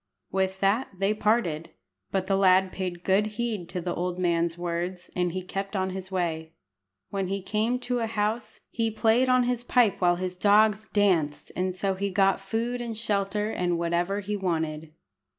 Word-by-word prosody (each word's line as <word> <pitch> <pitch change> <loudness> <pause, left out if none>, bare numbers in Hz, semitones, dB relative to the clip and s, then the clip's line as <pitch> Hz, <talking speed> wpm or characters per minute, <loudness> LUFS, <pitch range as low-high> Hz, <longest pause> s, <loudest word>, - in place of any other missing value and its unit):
With 190 0 -1
that 205 +7 +2
they 195 +2 +2
parted; 210 -7 0 0.4
but 190 -1 -1
the 195 - +1
lad 190 -1 +4
paid 180 -2 -4
good 195 +2 +3
heed 220 -7 -2
to 180 0 -3
the 175 0 -2
old 180 0 -2
man's 170 -1 +1
words, 175 +1 -3
and 180 -1 +1 0.2
kept 195 +2 -4
on 190 -1 0
his 190 0 -6
way. 165 -3 -2 0.6
When 195 -1 -1
he 195 +2 -2
came 220 +5 0
to 245 -1 -1
a 225 - -1
house, 220 +2 -2
he 230 -1 0
played 225 +3 +2
on 255 0 +5
his 245 -1 -1
pipe 245 -5 +3
while 175 -1 +4
his 180 0 -4
dogs 210 +2 +4
danced, 175 -8 +1
and 185 0 -1
so 195 +1 0
he 200 +1 -2
got 195 0 +2
food 230 +5 -2
and 230 -2 -4
shelter, 210 -1 0
and 175 -3 0
whatever 175 +4 0
he 205 +1 -3
wanted. 160 -5 -2
195 Hz, 180 wpm, -27 LUFS, 180-215 Hz, 0.6 s, on